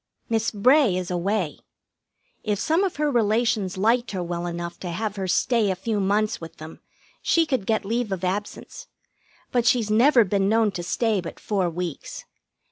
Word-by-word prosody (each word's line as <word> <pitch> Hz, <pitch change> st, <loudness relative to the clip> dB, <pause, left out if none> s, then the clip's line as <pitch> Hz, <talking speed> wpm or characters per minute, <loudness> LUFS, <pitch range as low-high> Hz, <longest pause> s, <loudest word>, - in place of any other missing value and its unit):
Miss 225 Hz, 0 st, +1 dB
Bray 240 Hz, -1 st, +4 dB
is 180 Hz, -1 st, -4 dB
away. 180 Hz, -1 st, -1 dB, 0.8 s
If 210 Hz, -2 st, 0 dB
some 320 Hz, -, +1 dB
of 380 Hz, -, -1 dB
her 295 Hz, 0 st, 0 dB
relations 220 Hz, -4 st, +1 dB
liked 230 Hz, +5 st, +2 dB
her 185 Hz, -2 st, -2 dB
well 175 Hz, 0 st, -3 dB
enough 170 Hz, 0 st, -5 dB
to 180 Hz, -, -5 dB
have 210 Hz, +4 st, -3 dB
her 190 Hz, -2 st, -3 dB
stay 225 Hz, +3 st, +2 dB
a 190 Hz, -, 0 dB
few 210 Hz, +3 st, -2 dB
months 205 Hz, +2 st, 0 dB
with 165 Hz, 0 st, -10 dB
them, 155 Hz, +1 st, -10 dB, 0.4 s
she 335 Hz, -1 st, +3 dB
could 260 Hz, -10 st, -2 dB
get 220 Hz, -2 st, 0 dB
leave 230 Hz, +1 st, -1 dB
of 190 Hz, -1 st, -3 dB
absence; 205 Hz, -, -4 dB, 0.6 s
but 240 Hz, -2 st, +1 dB
she's 230 Hz, -4 st, +2 dB
never 240 Hz, +3 st, +5 dB
been 195 Hz, 0 st, 0 dB
known 220 Hz, -1 st, +3 dB
to 180 Hz, -, -5 dB
stay 210 Hz, +3 st, 0 dB
but 170 Hz, -, -8 dB
four 195 Hz, -4 st, -1 dB
weeks. 170 Hz, -2 st, -6 dB
210 Hz, 180 wpm, -24 LUFS, 185-235 Hz, 0.8 s, never